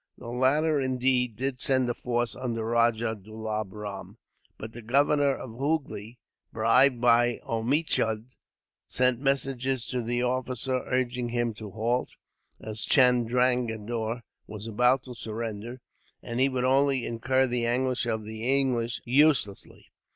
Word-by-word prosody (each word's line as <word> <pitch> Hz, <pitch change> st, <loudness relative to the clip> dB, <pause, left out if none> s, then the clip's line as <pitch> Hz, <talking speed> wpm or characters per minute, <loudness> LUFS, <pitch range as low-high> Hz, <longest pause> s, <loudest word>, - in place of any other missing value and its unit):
The 120 Hz, -, -9 dB
latter, 140 Hz, +5 st, +2 dB
indeed, 125 Hz, -2 st, +1 dB
did 130 Hz, +2 st, -3 dB
send 130 Hz, -3 st, +3 dB
a 120 Hz, -, 0 dB
force 120 Hz, 0 st, -2 dB
under 115 Hz, -3 st, -3 dB
Rajah 115 Hz, -1 st, +1 dB
Dulab 110 Hz, -1 st, -4 dB
Ram, 105 Hz, -1 st, -8 dB, 0.4 s
but 110 Hz, +1 st, -8 dB
the 120 Hz, -, -9 dB
governor 140 Hz, +4 st, +2 dB
of 130 Hz, -, -8 dB
Hoogly, 125 Hz, -4 st, -3 dB, 0.3 s
bribed 120 Hz, +3 st, +4 dB
by 120 Hz, 0 st, +3 dB
Omichund, 115 Hz, -1 st, -1 dB, 0.5 s
sent 125 Hz, -1 st, +1 dB
messages 135 Hz, -2 st, 0 dB
to 125 Hz, -1 st, -1 dB
this 120 Hz, +1 st, -1 dB
officer 130 Hz, 0 st, -1 dB
urging 125 Hz, -1 st, -1 dB
him 120 Hz, -1 st, -1 dB
to 105 Hz, -1 st, -9 dB
halt, 115 Hz, +5 st, -1 dB, 0.5 s
as 110 Hz, 0 st, -5 dB
Chandranagore 120 Hz, -2 st, +1 dB, 0.2 s
was 105 Hz, 0 st, -8 dB
about 125 Hz, +4 st, +2 dB
to 125 Hz, -, -9 dB
surrender, 115 Hz, +1 st, -6 dB, 0.4 s
and 120 Hz, 0 st, -4 dB
he 135 Hz, +1 st, +4 dB
would 130 Hz, -1 st, -1 dB
only 135 Hz, -1 st, +2 dB
incur 130 Hz, +3 st, +1 dB
the 120 Hz, -2 st, -1 dB
anger 130 Hz, +2 st, +1 dB, 0.2 s
of 110 Hz, -1 st, -2 dB
the 110 Hz, +1 st, -7 dB, 0.2 s
English, 120 Hz, -3 st, -1 dB
uselessly. 130 Hz, -5 st, +1 dB
120 Hz, 135 wpm, -27 LUFS, 115-130 Hz, 0.5 s, bribed